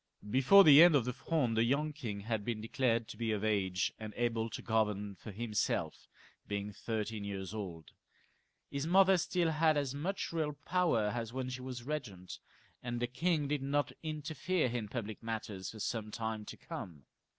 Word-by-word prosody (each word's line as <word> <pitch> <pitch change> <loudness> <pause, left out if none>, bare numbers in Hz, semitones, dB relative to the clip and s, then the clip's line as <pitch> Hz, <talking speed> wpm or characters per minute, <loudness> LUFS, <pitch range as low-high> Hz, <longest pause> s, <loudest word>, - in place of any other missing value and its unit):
Before 135 - +7
the 150 -2 +9
end 170 -2 +8
of 130 -5 +3
the 125 - -2
Fronde 135 -2 0
the 110 - +4
young 145 +5 +1
king 115 -9 -5
had 110 0 -2
been 115 0 -2
declared 115 0 0
to - - -8
be 115 -1 -1
of 105 -1 -1
age, 95 -4 +1
and 110 -1 -7
able 115 -1 0
to - - -6
govern 105 -3 0
for 105 +3 -10
himself^ 105 0 -2 0.4
being 100 0 -3
thirteen 110 -1 -3
years 100 -1 -5
old. 90 -7 -6 0.8
His 140 +2 -2
mother 190 +2 +6
still 170 -1 +1
had 155 0 +3
as 140 -2 -1
much 170 +6 -3
real 155 -2 0
power 145 -7 +1
as 115 -1 -4
when 130 -1 -3
she 125 0 -5
was 125 -2 -6
regent, 120 -11 -5 0.4
and 120 -1 -3
the 120 - +1
king 150 +4 0
did 145 -1 -1
not 140 +1 0
interfere 155 +2 -1
in 115 -3 -3
public 110 -1 -5
matters 110 -4 -4
for 110 - -9
some 110 0 -2
time 110 -1 -4
to - - -8
come. 75 -6 -8
120 Hz, 185 wpm, -34 LUFS, 105-145 Hz, 0.8 s, the